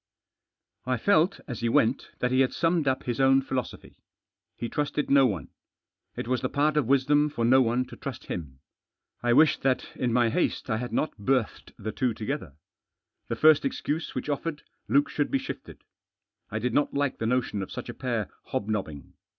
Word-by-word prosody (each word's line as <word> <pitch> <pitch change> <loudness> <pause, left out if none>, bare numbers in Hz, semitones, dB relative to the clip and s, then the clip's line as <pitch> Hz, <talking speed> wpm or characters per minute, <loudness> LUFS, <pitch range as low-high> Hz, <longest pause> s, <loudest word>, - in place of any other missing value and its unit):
I 130 -1 +1
felt, 190 - +3
as 120 -5 -5
he 115 - 0
went, 115 +3 +2
that 125 - +1
he 130 - +3
had 130 -1 +3
summed 165 -3 +1
up 130 0 +1
his 120 -1 -3
own 135 0 +5
philosophy. 130 -1 -5 0.6
He 120 - -4
trusted 150 +3 -2
no 135 -2 +6
one. 95 - -4 0.7
It - - -5
was 125 0 0
the 130 - -1
part 150 +1 +1
of 150 -6 +2
wisdom 145 +3 +3
for 120 -5 -1
no 130 +3 +6
one 125 +1 +1
to - - -11
trust 130 -2 -7
him. 70 -6 -6 0.6
I 120 0 +2
wished 150 +3 +5
that, 130 -1 0
in 125 -2 -1
my 120 -1 +3
haste, 135 -3 -1
I 110 - +1
hadn't 125 +3 -2
berthed 125 +1 -1
the 110 - -4
two 125 -3 -1
together. 110 - -4 0.7
The - - -2
first 155 -1 +5
excuse 150 +3 -3
which - - -3
offered 150 +1 -3 0.2
Luke 140 +6 +3
should 145 - -1
be - - +2
shifted. - - -8 0.7
I 110 - -3
did 120 +2 -1
not 145 +1 +1
like 140 -1 0
the 110 - -1
notion 125 -4 0
of 95 - -6
such - - -6
a - - -5
pair - - -2 0.2
hobnobbing. 100 - -4
130 Hz, 190 wpm, -27 LUFS, 115-145 Hz, 0.7 s, no